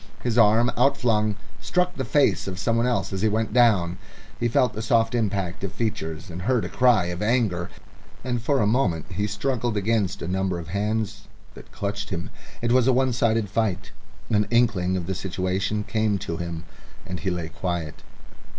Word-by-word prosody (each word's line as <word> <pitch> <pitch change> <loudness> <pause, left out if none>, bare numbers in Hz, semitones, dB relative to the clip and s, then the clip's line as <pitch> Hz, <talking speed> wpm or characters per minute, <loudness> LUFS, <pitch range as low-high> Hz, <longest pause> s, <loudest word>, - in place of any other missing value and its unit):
His 120 -2 0
arm, 115 +1 +5
outflung, 110 -6 +2 0.3
struck 180 0 0
the 135 - -3
face 115 - +2
of 95 -1 -4
someone 115 +5 +1
else 120 -5 -1
as 95 - -2
he 110 - +3
went 110 0 -1
down; 100 -8 +3 0.4
he 120 - +1
felt 120 +1 +2
the 110 - -4
soft 115 0 +2
impact 100 -5 -1
of 100 - -2
features 85 -6 -3
and 85 +2 -6
heard 120 +3 +1
a - - -4
cry 120 -7 +4
of 85 - -6
anger, 105 -6 +1 0.5
and 120 -2 -2
for 135 +3 +1
a - - +3
moment 100 - 0
he 100 +3 -1
struggled 115 +1 -1
against 105 -2 0
a - - -4
number 95 0 -1
of 85 -1 -7
hands 105 +1 -2 0.3
that - - -14
clutched 100 0 -4
him. 85 -2 -4 0.3
It 120 - +1
was 125 0 +4
a 130 - +5
one 130 0 +2
sided 115 -3 +1
fight. 105 -1 -1 0.4
An 105 -1 +2
inkling 100 -7 +2
of 90 - -4
the 95 - -2
situation 95 +3 -2
came 110 -1 0
to 85 -3 -4
him, 85 -1 -5 0.4
and 90 -2 -5
he 95 - -1
lay 85 -3 -3
quiet. 85 -3 -4
105 Hz, 185 wpm, -24 LUFS, 95-115 Hz, 0.5 s, arm